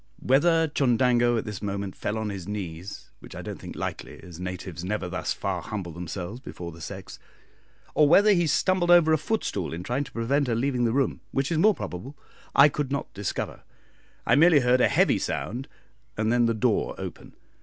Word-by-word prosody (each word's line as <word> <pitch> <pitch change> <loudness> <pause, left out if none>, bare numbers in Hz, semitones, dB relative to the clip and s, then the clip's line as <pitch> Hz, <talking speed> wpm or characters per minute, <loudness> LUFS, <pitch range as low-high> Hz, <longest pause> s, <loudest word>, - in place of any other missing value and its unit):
Whether 160 +5 +4
Chundango 120 -4 +2
at - - -2
this 105 -3 -6
moment 100 -1 -4
fell 105 - -3
on 110 -1 -2
his 95 -3 -7
knees, 95 -2 -6
which - - -12
I - - -7
don't - - -7
think - - -8
likely, - - -5
as 85 -1 -11
natives 90 -2 -6
never 95 -1 -2
thus 90 -1 -3
far - - -2
humble 95 -5 -5
themselves 90 +6 -6
before 85 -9 -8
the 85 0 -13
sex, - - -8 0.7
or 150 -2 +4
whether 205 +5 +6
he 175 -3 +2
stumbled 185 +2 +2
over 170 -2 +6
a - - +4
footstool 155 - -2
in 85 - -6
trying 125 +7 -1
to - - -13
prevent 135 +5 0
her 115 - 0
leaving 125 0 0
the 115 - +2
room 135 +2 0
which 135 +4 -1
is 160 - +1
more 210 +3 +5
probable 130 +11 -7 0.4
I 140 - +8
could 145 -2 -3
not 140 - -3
discover. 100 +1 -4 0.6
I - - +3
merely 160 -1 +6
heard 125 0 +3
a - - +5
heavy - - +3
sound 125 +5 -3 0.5
and 110 +2 +1
then 120 -1 +3
the 115 - +1
door 110 -1 0
open. - - -8
120 Hz, 195 wpm, -26 LUFS, 100-145 Hz, 0.7 s, I